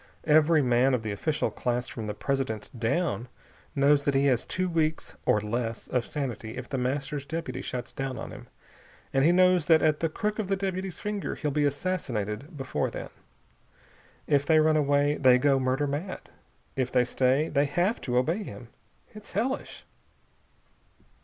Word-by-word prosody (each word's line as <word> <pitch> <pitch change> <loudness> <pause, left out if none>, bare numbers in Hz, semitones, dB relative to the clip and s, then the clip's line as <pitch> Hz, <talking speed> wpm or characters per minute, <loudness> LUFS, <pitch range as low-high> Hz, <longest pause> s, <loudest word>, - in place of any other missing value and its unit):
Every 155 0 +5
man 125 +1 +3
of 115 - -3
the 110 - -3
official 145 +9 -1
class 125 0 -2
from 110 -3 -6
the 105 - -4
President 130 -5 -2
down 120 - -1 0.5
knows 140 +1 +4
that 140 - +1
he 135 +1 +3
has 130 -4 +2
two 185 0 -1
weeks 160 -2 -1
or 105 - +4
less 115 +2 -3
of 125 -2 0
sanity 120 -6 -4
if - - -6
The 135 - -2
Master's 135 +3 -2
deputy 150 -3 -4
shuts 125 -1 -5
down 135 -1 -4
on - - -6
him - - -11 0.7
and 135 - +3
he 165 - +6
knows 180 -2 +4
that 160 -2 +5
at 155 -1 +3
the 165 - 0
crook 210 +6 -2
of 210 - -1
the 195 - +1
deputy's 190 -1 -3
finger 210 -1 -3
he'll 150 - -2
be 145 +1 +1
assassinated 145 - -2
before 135 -1 -1
then. - - -7 1.2
If 140 -1 +3
they 155 +2 +4
run 155 0 +4
away, 145 0 +2
they 130 -2 +6
go 135 +1 +3
murder 130 +3 +1
mad. 150 +7 -4 0.5
If 130 -1 -1
they 125 -1 +3
stay, 130 +5 +2
they 145 0 +2
have 175 +9 0
to 125 -1 -1
obey 160 +11 +1
him. - - -9 0.4
It's 215 -1 -12
hellish!" 240 +7 -2
145 Hz, 175 wpm, -27 LUFS, 125-165 Hz, 1.2 s, he